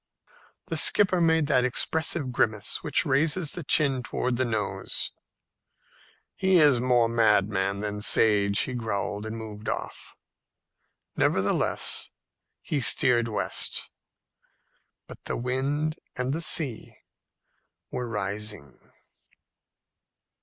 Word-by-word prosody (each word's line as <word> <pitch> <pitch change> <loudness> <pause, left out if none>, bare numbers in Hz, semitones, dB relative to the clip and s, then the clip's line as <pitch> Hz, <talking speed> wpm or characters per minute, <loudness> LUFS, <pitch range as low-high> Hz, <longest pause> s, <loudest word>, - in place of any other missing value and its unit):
The - - -3
skipper 185 -3 +4
made 160 -2 +2
that 130 -3 +2
expressive 145 +2 -1
grimace 110 -4 -1
which - - 0
raises 150 +4 +1
the 175 - -6
chin 135 -2 +2
towards 125 0 -3
the 130 - 0
nose. 110 -4 -2 1.2
"He 190 -1 +2
is 145 -7 +4
more 125 -2 +2
madman 105 -3 +1
than 105 0 -4
sage," 100 -2 +3
he 130 - -2
growled, 105 -2 -4
and 110 +1 -6
moved 110 -1 -7
off. - - -6 1.0
Nevertheless - - +1 0.5
he 150 - -2
steered 120 -1 +3
west. 110 - -1 1.1
But - - -13
the - - -3
wind 140 +5 -2 0.2
and 125 +1 -2
the 165 - -3
sea 145 -8 -1 1.0
were 125 -1 -4
rising. 105 - -4
120 Hz, 105 wpm, -26 LUFS, 105-145 Hz, 1.2 s, skipper